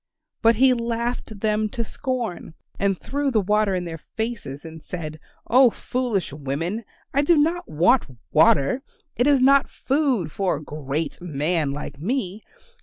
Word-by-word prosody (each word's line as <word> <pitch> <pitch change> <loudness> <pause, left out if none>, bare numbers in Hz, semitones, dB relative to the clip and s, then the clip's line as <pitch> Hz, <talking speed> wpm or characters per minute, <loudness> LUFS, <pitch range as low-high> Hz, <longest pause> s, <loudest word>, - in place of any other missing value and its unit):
But 230 +1 +5
he 260 +3 +5
laughed 235 -2 -3
them 215 0 +1
to 235 +1 -3
scorn, 230 - -4 0.2
and 195 -2 +1
threw 285 +1 -1
the 230 -5 +2
water 210 0 +2
in 180 -1 -2
their 165 -1 -6
faces 210 - -5
and 160 -1 -9
said, 155 -2 -6 0.3
"Oh, 255 +1 +6
foolish 235 - -2
women, 160 +10 -3 0.3
I 280 - +4
do 320 +3 +4
not 335 +4 +1
want 180 - +3 0.2
water; 150 - +4 0.3
it 245 - +2
is 280 -3 +4
not 275 +1 +5
food 265 - 0
for 195 +1 0
a - - -7
great 150 +2 -4
man 155 -2 0
like 140 0 -6
me. 210 - -2
210 Hz, 155 wpm, -23 LUFS, 160-255 Hz, 0.3 s, Oh